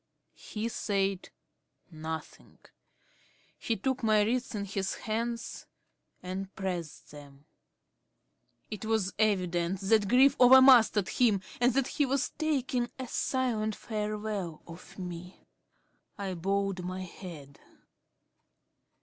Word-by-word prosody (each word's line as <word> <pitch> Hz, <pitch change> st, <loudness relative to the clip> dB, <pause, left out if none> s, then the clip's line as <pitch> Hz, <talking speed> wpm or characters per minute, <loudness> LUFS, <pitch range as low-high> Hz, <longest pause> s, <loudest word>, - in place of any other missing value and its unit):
He 215 Hz, +1 st, -4 dB
said 195 Hz, -4 st, -1 dB, 0.6 s
nothing. 160 Hz, 0 st, -7 dB, 1.0 s
He 230 Hz, -, -1 dB
took 265 Hz, +6 st, -1 dB
my 215 Hz, -2 st, +4 dB
wrists 245 Hz, +2 st, -1 dB
in 200 Hz, -1 st, -3 dB
his 195 Hz, -1 st, -3 dB
hands 230 Hz, +2 st, -4 dB, 0.6 s
and 190 Hz, +1 st, -5 dB
pressed 180 Hz, -5 st, -5 dB
them. 145 Hz, -1 st, -14 dB, 1.3 s
It 210 Hz, -2 st, -5 dB
was 220 Hz, -4 st, 0 dB
evident 180 Hz, -4 st, +1 dB
that 205 Hz, +1 st, +3 dB
grief 265 Hz, +5 st, +5 dB
over 255 Hz, +1 st, +9 dB
mastered 235 Hz, -7 st, +6 dB
him 220 Hz, -6 st, +2 dB, 0.2 s
and 245 Hz, 0 st, +3 dB
that 275 Hz, -1 st, +3 dB
he 290 Hz, -, 0 dB
was 275 Hz, +1 st, 0 dB
taking 265 Hz, -6 st, -1 dB
a 260 Hz, -1 st, -5 dB
silent 230 Hz, -5 st, -1 dB
farewell 210 Hz, -5 st, -4 dB
of 170 Hz, +1 st, -12 dB
me. 180 Hz, -1 st, -8 dB, 0.7 s
I 195 Hz, -2 st, -3 dB
bowed 195 Hz, +1 st, -1 dB
my 185 Hz, +1 st, -4 dB
head. 165 Hz, -6 st, -10 dB
205 Hz, 110 wpm, -30 LUFS, 185-235 Hz, 1.3 s, over